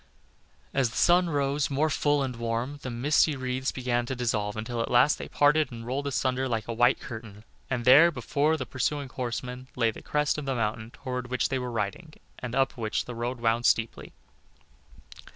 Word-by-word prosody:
As 135 -3 +2
the 110 - -11
sun 175 0 +4
rose 145 -1 0
more 150 +3 +1
full 145 -1 +2
and 130 -2 -3
warm, 115 +5 -3
the 130 - -5
misty 145 +5 +2
wreaths 130 0 -2
began 120 -2 -1
to 130 - -3
dissolve, 110 -4 -1
until 115 +2 -3
at - - -2
last 125 +5 +4
they - - -7
parted 145 -1 +3
and 115 -1 -8
rolled 135 +4 -2
asunder 130 -1 0
like 110 -2 -2
a 115 - -3
white 120 +3 +3
curtain 110 -3 -9 0.3
and 125 -2 -2
there, 140 +7 +8
before 155 -1 0
the 130 - -4
pursuing 140 +2 -2
horsemen, 125 0 -5
lay 115 -2 +2
the - - -11
crest 150 0 0
of 150 - -6
the 135 -1 -1
mountain 110 -1 -2
toward 125 0 -5
which 125 0 0
they 135 - -1
were 125 0 -4
riding, 115 - -4 0.3
and 125 -1 -5
up 135 0 +1
which 110 -2 -2
the 125 - -6
road 120 +2 -3
wound 115 +1 +2
steeply. 115 0 0
125 Hz, 195 wpm, -27 LUFS, 115-140 Hz, 0.3 s, there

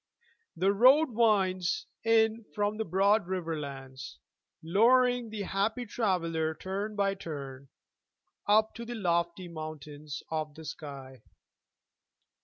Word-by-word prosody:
The 190 +4 +2
road 260 +7 +6
winds 195 -6 +2 0.2
in 225 0 +3
from 205 0 0
the 220 - -1
broad 195 +3 +2
riverlands, 140 - -5 0.5
Luring 245 +6 +3
the 215 -2 -4
happy 215 +6 -1
traveler 165 -8 -1
turn 200 +5 -4
by 200 -1 +1
turn, 140 -7 -8 0.8
Up 215 +1 +4
to 235 - -7
the 240 +1 -6
lofty 170 -2 -1
mountains 150 -3 -7
of 155 -2 -3
the 160 0 -10
sky. 135 -4 -8
190 Hz, 110 wpm, -30 LUFS, 155-220 Hz, 0.8 s, road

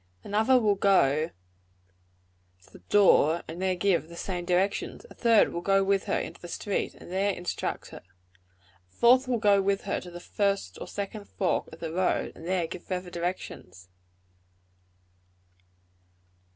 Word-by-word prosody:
Another 220 +5 +3
will 215 -3 +3
go 160 -6 +3 1.3
to - - -23
the - - -13
door, 170 -5 +5
and 165 +3 -7
there 190 -1 +1
give 175 -4 +1
the 170 - -10
same 175 0 -4
directions. 185 +3 -1
A - - -9
third 230 -2 +4
will 170 - -3
go 195 +1 +3
with 195 0 +1
her - - 0
into - - -7
the 175 - -8
street, 200 +3 -3
and - - -13
there 195 +2 +1
instruct 175 -2 -4
her. - - -10 0.9
A - - -37
fourth 255 - +4
will 250 -2 +1
go 205 -3 +4
with 195 0 0
her - - -2
to 180 - -10
the 175 0 -9
first 200 +2 -2
or - - -6
second 200 +1 -5
fork 190 - -1
of 160 - -13
the 165 -1 -4
road, 185 +1 0
and 165 - -10
there 180 -2 +1
give 165 - -8
further 180 -1 -5
directions. 170 - -5
190 Hz, 165 wpm, -28 LUFS, 175-200 Hz, 1.3 s, door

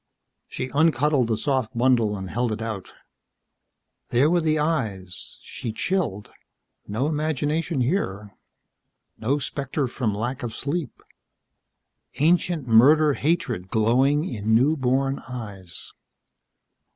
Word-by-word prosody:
She 130 - -5
uncuddled 145 -4 +3
the 110 -2 0
soft 130 -1 -1
bundle, 115 -5 +2
held 120 +5 -1
it 110 - -3
out. 110 -4 -5 1.2
There 135 +6 +3
were 175 -1 +3
the 155 -1 +1
eyes. 110 - -2
She 115 - -6
chilled. 115 - -2 0.6
No 110 +6 -1
imagination 155 0 -1
here. 105 - -2 0.8
No 135 +6 +1
spectre 140 0 -2
from 120 -2 -2
lack 120 +5 -3
of 115 -2 -5
sleep. 145 0 -4 1.1
Ancient 165 -2 +1
murder 145 +7 +6
hatred 140 - -1
glowing 130 - +2
in 110 - 0
new 140 +7 +4
born 135 0 0
eyes. 100 -8 -8
130 Hz, 110 wpm, -24 LUFS, 110-150 Hz, 1.2 s, murder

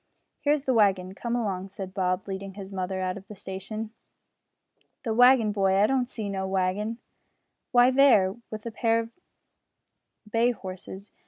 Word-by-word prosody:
"Here 290 - +2
is 295 -2 -1
the 260 - +1
wagon; 190 -4 +2
come 235 +4 -3
along," 195 -5 -2
said 190 -1 -7
Bob, 185 0 -1
leading 195 0 -6
his 200 -1 -8
mother 190 0 -3
out 185 0 -2
of 195 -1 -12
the 210 - -10
station. 200 +4 -6 1.1
"The 230 -4 -1
waggin, 245 -2 +6
boy; 195 -2 +2
I 200 +2 +5
don't 255 +1 +1
see 220 -5 -5
no 190 -1 -3
waggin." 195 +4 -1 0.7
"Why, 245 +1 +6
there, 240 -8 +5
with 215 -1 -7
the 230 - -5
pair 230 0 +1
of 230 0 -5 1.2
bay 230 +3 +2
horses." 190 0 -9
205 Hz, 165 wpm, -27 LUFS, 190-230 Hz, 1.2 s, waggin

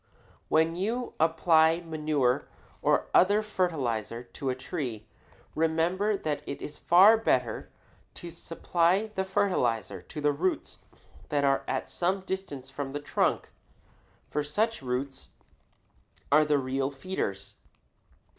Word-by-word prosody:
When 160 +1 +3
you 230 +7 -2
apply 160 0 +4
manure 155 -6 0 0.3
or - - +1
other 205 +4 +5
fertilizer 130 - -2
to 135 +2 -5
a 130 - 0
tree, 130 -5 -5 0.5
remember 170 +6 +1
that 150 -5 -3
it 140 - -5
is 150 - -7
far 195 +6 +7
better 125 - 0 0.5
to 175 - -8
supply 175 +5 0
the 190 - -1
fertilizer 180 - 0
to - - -9
the 150 0 +2
roots 175 +6 -2 0.5
that 145 -1 +1
are 135 -1 +3
at - - -2
some 185 +2 -1
distance 185 -9 -5
from 135 0 -5
the 145 - -2
trunk, 145 - 0 0.8
for 150 - -1
such 215 +10 -1
roots 130 +1 -4 1.0
are 155 +1 +6
the 150 -1 +3
real 135 0 -1
feeders. 140 - -5
155 Hz, 125 wpm, -28 LUFS, 135-185 Hz, 1.0 s, far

